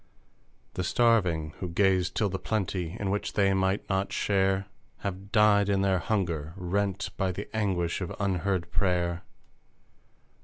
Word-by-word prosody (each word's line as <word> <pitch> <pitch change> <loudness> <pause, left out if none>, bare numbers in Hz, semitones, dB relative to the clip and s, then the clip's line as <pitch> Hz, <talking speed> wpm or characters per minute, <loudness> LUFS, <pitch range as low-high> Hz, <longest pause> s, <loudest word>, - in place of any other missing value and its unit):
The 90 - -2
starving, 90 -8 +2
who 90 - -4
gazed 90 0 +2
till 105 - +2
the 95 0 -3
plenty 95 -3 -2
In 100 -2 -1
which 105 - -2
they 100 -2 +3
might 95 +1 0
not 95 0 0
share 95 -1 +1 0.4
Have 100 0 -5
died 105 -3 +4
in 100 -1 +2
their 95 -2 +2
hunger, 85 -7 -1
rent 100 +2 -1
by 95 -1 0
The 100 +3 -6
anguish 95 -5 0
of 90 - -4
unheard 95 -2 -1
prayer 90 -2 0
95 Hz, 145 wpm, -28 LUFS, 90-100 Hz, 0.4 s, died